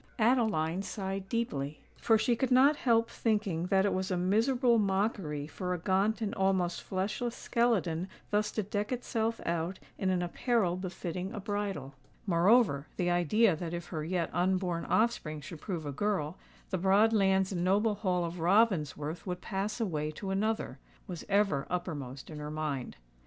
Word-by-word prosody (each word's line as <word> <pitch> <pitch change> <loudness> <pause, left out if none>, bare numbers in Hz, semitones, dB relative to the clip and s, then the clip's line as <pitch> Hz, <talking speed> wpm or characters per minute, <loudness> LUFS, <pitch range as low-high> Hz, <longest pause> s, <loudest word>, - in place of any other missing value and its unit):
Adeline 215 -8 +2
sighed 195 -1 -4
deeply—for 220 - -1
she 235 +2 +2
could 260 +2 0
not 265 +4 +6
help 230 -4 +2
thinking 205 -8 -1
that 190 +1 +3
it 205 - +1
was 185 0 -1
a 185 - 0
miserable 230 +6 +3
mockery 190 -7 0
for 180 +3 -3
a - - -3
gaunt 195 +6 +1
and 210 - -2
almost 190 -2 +1
fleshless 215 +5 -2
skeleton 195 -8 0 0.2
thus 210 0 +1
to 215 - -1
deck 205 +2 -3
itself 230 -2 -1
out 170 +2 -1 0.2
in 190 - +1
an 180 -1 +1
apparel 190 0 +1
befitting 185 0 -4
a - - -4
bridal:—moreover, 190 - 0
the 175 -1 +1
idea 175 +3 +3
that 170 +1 -4
if 175 0 -7
her 155 -3 -3
yet 170 0 -1
unborn 180 -1 0
offspring 190 -9 +1
should 150 +2 -9
prove 170 -6 -4
a 145 - -3
girl, 175 0 -1 0.4
the 185 - 0
broad 200 +5 +4
lands 190 -2 +3
and 175 -2 -1
noble 205 +4 +3
Hall 185 -4 0
of 170 +1 -5
Ravensworth 170 -4 +1
would 180 -1 -3
pass 200 +4 -3
away 155 -9 -1
to 190 +5 -5
another, 205 -8 -1 0.3
was 175 -3 -6
ever 195 -8 +2
uppermost 145 -7 -4
in 150 - -7
her 150 0 -5
mind. 150 - -3
190 Hz, 160 wpm, -31 LUFS, 170-215 Hz, 0.4 s, not